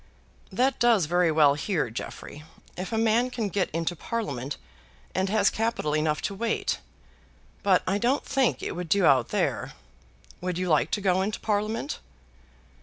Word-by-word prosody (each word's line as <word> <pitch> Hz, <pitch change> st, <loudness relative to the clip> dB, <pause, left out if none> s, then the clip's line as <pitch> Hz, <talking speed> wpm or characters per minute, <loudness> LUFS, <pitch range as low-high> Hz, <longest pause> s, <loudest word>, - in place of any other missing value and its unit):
"That 255 Hz, +7 st, +1 dB
does 230 Hz, -7 st, +4 dB
very 175 Hz, +1 st, +2 dB
well 150 Hz, -2 st, +5 dB
here, 150 Hz, -, -1 dB
Jeffrey, 145 Hz, +5 st, -7 dB, 0.3 s
if 185 Hz, +4 st, -5 dB
a 225 Hz, -, 0 dB
man 225 Hz, +3 st, +3 dB
can 225 Hz, -4 st, -2 dB
get 190 Hz, -1 st, 0 dB
into 165 Hz, +2 st, -2 dB
Parliament 145 Hz, -, -4 dB, 0.6 s
and 190 Hz, +1 st, 0 dB
has 210 Hz, -1 st, +3 dB
capital 225 Hz, -9 st, -1 dB
enough 155 Hz, 0 st, 0 dB
to -, -, -1 dB
wait; 225 Hz, +3 st, -1 dB, 0.8 s
but 190 Hz, -2 st, +3 dB
I 195 Hz, +2 st, 0 dB
don't 250 Hz, +6 st, +1 dB
think 265 Hz, -2 st, +1 dB
it -, -, -2 dB
would 175 Hz, -1 st, -5 dB
do 200 Hz, +1 st, +4 dB
out 130 Hz, -6 st, +5 dB
there. -, -, -1 dB, 0.7 s
Would 180 Hz, -1 st, -2 dB
you 185 Hz, 0 st, -1 dB
like 155 Hz, -2 st, +3 dB
to 205 Hz, -, -1 dB
go 190 Hz, -1 st, +2 dB
into 210 Hz, +2 st, -2 dB
Parliament?" 215 Hz, +6 st, -1 dB
190 Hz, 165 wpm, -27 LUFS, 160-225 Hz, 0.8 s, well